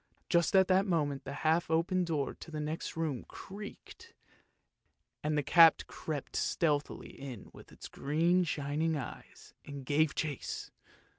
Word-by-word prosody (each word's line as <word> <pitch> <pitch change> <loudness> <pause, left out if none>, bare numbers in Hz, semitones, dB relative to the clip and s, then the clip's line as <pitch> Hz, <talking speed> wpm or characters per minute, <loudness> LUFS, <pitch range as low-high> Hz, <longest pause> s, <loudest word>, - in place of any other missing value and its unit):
Just 170 0 +3
at 190 -1 +6
that 190 +2 +3
moment 145 -6 0
the 135 - -5
half 160 +1 +3
open 170 +3 +2
door 155 -5 -1
to - - -12
the 155 -1 -5
next 155 +2 -4
room 155 -7 -2
creaked, 210 - -10 1.1
and 150 0 0
the 150 - +1
cat 165 +2 +7
crept 150 -3 -5
stealthily 150 -3 0
in 130 -7 -9
with - - -13 0.2
green 165 +6 +2
shining 155 0 -1
eyes, 135 - -9
and 140 -2 -8
gave 150 +2 +2
chase. 150 -4 -4
155 Hz, 140 wpm, -32 LUFS, 145-170 Hz, 1.1 s, cat